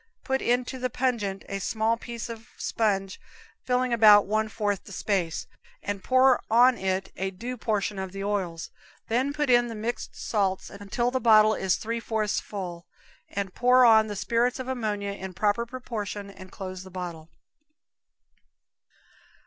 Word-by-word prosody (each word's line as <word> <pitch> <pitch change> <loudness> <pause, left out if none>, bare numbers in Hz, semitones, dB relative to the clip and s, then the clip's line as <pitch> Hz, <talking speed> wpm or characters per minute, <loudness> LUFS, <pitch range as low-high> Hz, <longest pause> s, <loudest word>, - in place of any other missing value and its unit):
Put 265 0 0
into 250 +2 0
the 255 0 -1
pungent 225 -7 -1
a 195 - -4
small 220 +3 0
piece 235 0 -7
of 230 -1 -9
sponge 195 -4 -1 0.4
filling 250 -1 +1
about 210 -3 +7
one 215 +2 0
fourth 205 -3 -2
the - - -12
space, 185 -4 -1 0.4
and 200 -1 -4
pour 260 0 +4
on 245 +3 +6
it 190 -2 -2
a 190 0 -1
due 235 +7 -6
proportion 210 -3 -1
of 190 -1 -4
the 195 +1 -5
oils, 185 -5 -3 0.4
then 255 +5 +1
put 295 0 -1
in 240 0 +5
the 230 - -6
mixed 225 +3 -4
salts 195 -3 -1
until 205 +5 -2
the 260 0 -1
bottle 215 -1 +6
is 190 -3 +1
three 230 +1 -3
fourths 220 -2 -1
full, 180 -4 -7 0.4
and 195 -2 -4
pour 250 +1 +5
on 220 -2 +6
the 205 - -5
spirits 235 +4 +1
of 260 -1 -6
ammonia 210 -6 -2
in 190 -2 -7
proper 210 +4 +1
proportion 210 -5 -5
and 185 -1 -13
close 185 -2 -7
the 190 - -11
bottle. 175 -3 -7
215 Hz, 160 wpm, -27 LUFS, 195-240 Hz, 0.4 s, about